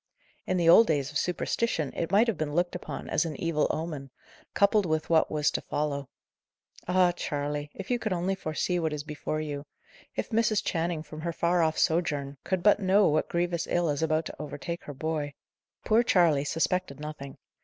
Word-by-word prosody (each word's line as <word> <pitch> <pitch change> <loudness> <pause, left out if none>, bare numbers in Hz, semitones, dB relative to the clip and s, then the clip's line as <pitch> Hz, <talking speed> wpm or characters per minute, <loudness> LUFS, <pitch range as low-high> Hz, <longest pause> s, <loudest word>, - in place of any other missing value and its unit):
In 185 - +1
the 170 -2 +2
old 220 +7 +8
days 145 -3 0
of 150 - -1
superstition 180 - -1
it 165 - -2
might 205 +4 +5
have 230 -4 0
been 155 -2 -3
looked 175 +1 +1
upon 180 - -6
as - - +1
an 160 -3 -4
evil 165 -3 +1
omen, 155 -4 -4 0.5
coupled 200 -1 +3
with 155 +1 -1
what 160 -1 +4
was 150 -1 +1
to - - -2
follow. 140 -2 -2 0.8
Ah, 180 0 +4
Charley! 145 -3 -3
if 195 +4 -6
you 245 - +2
could 215 -3 -3
only 180 +2 0
foresee 180 0 -1
what 160 -2 -1
is 150 -1 -4
before 150 0 -4
you! 145 -2 -4 0.5
If - - -3
Mrs. 220 -1 +2
Channing, 165 -2 -1
from 155 0 -9
her 170 +1 -2
far 170 +1 +1
off 160 -1 +1
sojourn, 145 -4 0
could 185 -2 -1
but 205 +1 +5
know 195 +1 +4
what 155 +1 +1
grievous 175 0 -1
ill 175 -3 +1
is 145 - -2
about 160 0 +1
to - - -7
overtake 150 +3 -6
her 145 - -6
boy! 150 -1 -3 0.5
Poor 220 +2 +4
Charley 170 -11 +3
suspected 165 -1 -1
nothing. 150 -2 -7
165 Hz, 195 wpm, -28 LUFS, 150-180 Hz, 0.8 s, old